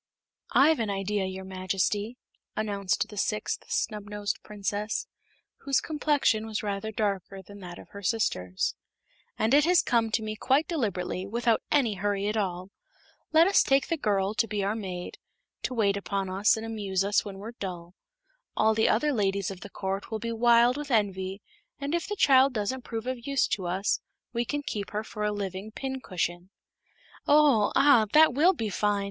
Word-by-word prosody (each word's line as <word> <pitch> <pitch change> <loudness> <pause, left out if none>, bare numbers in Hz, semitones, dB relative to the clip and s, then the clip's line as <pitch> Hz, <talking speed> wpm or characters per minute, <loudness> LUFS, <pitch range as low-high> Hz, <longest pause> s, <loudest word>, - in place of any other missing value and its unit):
"I've 310 +1 +5
an 225 -2 -1
idea, 195 0 -1
your 190 0 -5
Majesty," 190 +4 -1 0.4
announced 200 -3 -1
the 210 - -10
sixth 210 +1 -2
Snubnosed 210 -1 -3
Princess, 210 +1 -3 0.5
whose 275 -2 +1
complexion 290 -8 +1
was 220 0 -3
rather 205 +1 -3
darker 195 -2 -2
than 200 +2 -13
that 175 -2 -9
of - - -13
her 200 - -10
sisters, 95 - 0 0.6
"and 220 +4 +1
it 295 +1 +6
has 355 0 +4
come 230 -2 +2
to 220 - +1
me 215 0 -4
quite 270 +7 +2
deliberately, 195 - -2
without 230 +1 +1
any 260 -7 +3
hurry 200 0 -1
at 210 +1 -1
all. 185 -2 -2 0.6
Let 320 +1 +6
us 390 +2 +5
take 270 0 +2
the - - +1
little 305 - -15
girl 200 -1 +1
to 225 +1 +1
be 205 -2 -2
our 200 +2 0
maid 185 -5 -6 0.4
to 255 - -3
wait 200 -3 +2
upon 195 -1 -3
us 200 +4 +3
and 220 - -5
amuse 200 -4 -1
us 200 +1 +2
when 200 -2 -8
we're 210 +4 -7
dull. 180 -6 -7 0.6
All 220 +1 +4
the 220 0 +2
other 290 +7 +2
ladies 200 -3 0
of 190 - -8
the 200 - -9
court 195 +1 -4
will 220 - -2
be 230 +1 -4
wild 235 +2 +4
with 295 -1 -5
envy, 195 -4 0 0.4
and 285 +2 -3
if 340 -1 -1
the 415 - -3
child 270 -6 +5
doesn't 220 +5 -2
prove 225 -1 -5
of 255 -1 -4
use 275 -2 +2
to 185 -3 -2
us 190 +4 0 0.3
we 235 0 0
can 290 +4 -3
keep 205 -7 -4
her 210 +1 -3
for 210 -1 -6
a 210 - +1
living 200 0 -4
pincushion." 185 -9 -4 0.8
"Oh! 285 -8 +5
Ah! 260 -6 +6
That 310 -3 +7
will 325 +8 +5
be 225 - -3
fine!" 205 +1 +1
210 Hz, 185 wpm, -28 LUFS, 195-240 Hz, 0.8 s, That